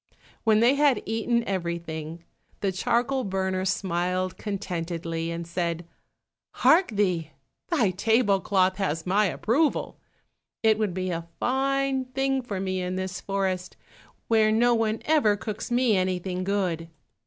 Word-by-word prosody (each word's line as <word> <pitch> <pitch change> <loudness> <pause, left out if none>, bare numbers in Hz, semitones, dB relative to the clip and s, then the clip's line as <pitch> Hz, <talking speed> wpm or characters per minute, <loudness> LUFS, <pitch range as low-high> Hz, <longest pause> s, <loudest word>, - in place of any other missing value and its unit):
When 220 -1 +4
they 240 +3 +5
had 280 -4 +3
eaten 230 +2 0
everything, 170 -3 -4 0.4
the 195 - +1
charcoal 245 +8 0
burner 190 -2 -1
smiled 185 -1 -1
contentedly, 170 -4 -4
and 170 0 -4
said, 170 0 -2 0.7
"Hark 360 +4 +5
thee, 185 -7 0 0.4
thy 245 - +2
table 205 +1 +2
cloth 190 -1 +2
has 165 -5 -2
my 200 +3 +3
approval; 270 - 0 0.6
it 220 -1 +4
would 205 -5 -1
be 185 -1 -2
a 165 -1 -4
fine 270 0 +1
thing 270 +1 0
for 210 -6 -5
me 185 -1 -2
in 180 0 -3
this 185 0 -4
forest, 190 -2 -2 0.5
where 220 -1 +4
no 240 +2 +4
one 225 -1 0
ever 290 -10 +3
cooks 215 +2 -5
me 240 -2 +3
anything 185 0 -1
good. 180 -4 -1
195 Hz, 135 wpm, -26 LUFS, 180-230 Hz, 0.7 s, they